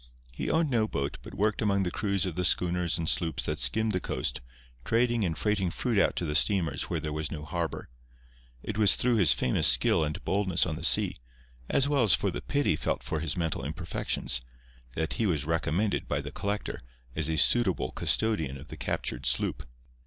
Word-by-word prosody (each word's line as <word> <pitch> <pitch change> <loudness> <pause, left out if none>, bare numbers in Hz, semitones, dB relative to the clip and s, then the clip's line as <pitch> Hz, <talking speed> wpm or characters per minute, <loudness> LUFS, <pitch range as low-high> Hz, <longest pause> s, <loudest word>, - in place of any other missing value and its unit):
He - - -4
owned 160 -3 +1
no 110 -3 +2
boat, 70 -7 -3
but - - -11
worked 105 +2 0
among 100 -2 +1
the 90 - -2
crews 100 -2 0
of 90 - -3
the 90 +3 -2
schooners 90 -1 +1
and 80 -1 -3
sloops 80 -2 0
that - - -3
skimmed 110 0 +2
the 90 - 0
coast, - - -3 0.4
trading 120 - +1
and 80 -4 -2
freighting 105 -4 0
fruit 115 +4 -1
out - - +2
to 85 - -2
the 75 - -2
steamers 80 -3 +1
where 85 - -1
there 75 0 -4
was 75 0 -3
no 75 -1 -6
harbour. 85 +2 -4 0.8
It 110 -1 -4
was 105 -2 +6
through 120 -1 +2
his 95 -8 +6
famous 65 - +2
skill - - +4
and 75 0 -4
boldness 95 -3 +2
on 80 -3 -3
the - - -7
sea, - - +3 0.5
as 140 - +3
well 145 -2 +2
as 110 -6 +6
for - - -1
the - - -5
pity 145 - 0
felt - - -2
for 80 - -3
his 80 +1 -3
mental 80 -3 -2
imperfections, 75 -6 -2 0.5
that 80 0 -1
he 110 - 0
was 75 -6 -1
recommended 80 +5 -1
by - - -1
the - - -6
collector 105 +1 -3 0.4
as 80 0 0
a 80 - -1
suitable 95 +4 +3
custodian 80 -12 0
of 65 - -13
the - - -8
captured - - -3
sloop. - - -1
90 Hz, 205 wpm, -28 LUFS, 80-105 Hz, 0.8 s, was